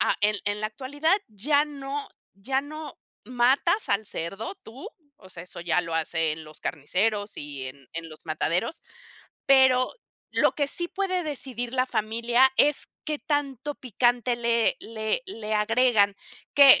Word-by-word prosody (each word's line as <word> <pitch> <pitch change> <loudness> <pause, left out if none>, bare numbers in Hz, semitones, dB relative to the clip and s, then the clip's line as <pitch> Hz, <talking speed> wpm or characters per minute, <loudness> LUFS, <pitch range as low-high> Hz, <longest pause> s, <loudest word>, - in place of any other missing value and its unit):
ah, - - +3
en 210 +1 +3
en 205 +1 0
la 215 - 0
actualidad, 290 - 0
ya 285 +8 +2
no 285 -1 -5 0.3
ya 265 +7 -1
no 300 0 -8 0.3
matas 260 - +2
al 200 +2 +1
cerdo 195 - -4
tú, 260 - -9 0.3
o 185 - -16
sea, 170 - -9
eso 180 - -9
ya 170 0 +2
lo 165 -2 -5
hacen 160 -1 0
los 155 0 -14
carniceros 205 +7 -1
y 140 -3 -6
en 135 -1 -14
en 165 0 -4
los 155 - -12
mataderos, 170 - -1 0.6
pero 260 -2 +5 0.4
lo - - +3
que 285 - 0
sí 345 +5 0
puede 370 -2 -1
decidir 260 -5 -4
la 255 0 +1
familia 235 +4 +2
es 295 0 +4 0.2
qué 305 -1 -1
tanto 290 -1 -2
picante 245 0 +1
le 235 -1 +2
le 220 - -2
le 220 - -4
agregan, 215 -1 +3 0.4
que 280 -2 +9
240 Hz, 155 wpm, -26 LUFS, 200-280 Hz, 0.6 s, que